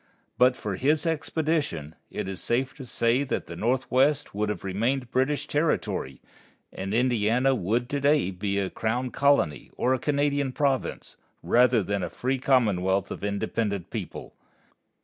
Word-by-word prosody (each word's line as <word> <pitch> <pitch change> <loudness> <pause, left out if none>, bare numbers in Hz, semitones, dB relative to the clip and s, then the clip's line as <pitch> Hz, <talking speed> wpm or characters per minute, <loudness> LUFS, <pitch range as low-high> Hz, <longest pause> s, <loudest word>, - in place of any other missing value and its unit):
But 125 0 +5
for 100 -6 -4
his 150 - +1
expedition, 155 - -1 0.2
it - - -4
is 95 -3 -5
safe 130 +3 0
to 135 - -8
say 120 +2 +1
that - - -2
the - - -8
Northwest 130 +4 +1
would 105 +1 -1
have 105 - -4
remained 115 +7 -1
British 145 +3 +1
territory, 145 - -1 0.5
and 95 +1 -5
Indiana 120 +2 +2
would 120 +2 0
to 145 - -1
day 145 -8 +3
be 100 +2 -2
a 95 -1 -1
crown 120 +3 -2
colony 140 - +2
or 130 - +2
a 130 - 0
Canadian 145 -1 0
province, 140 -2 -1 0.3
rather 120 -2 +4
than 100 +1 -2
a - - -3
free 130 +1 -2
commonwealth 100 -8 +2
of - - -6
an 100 - -1
independent 100 -2 -2
people. - - -6
125 Hz, 155 wpm, -26 LUFS, 100-140 Hz, 0.5 s, But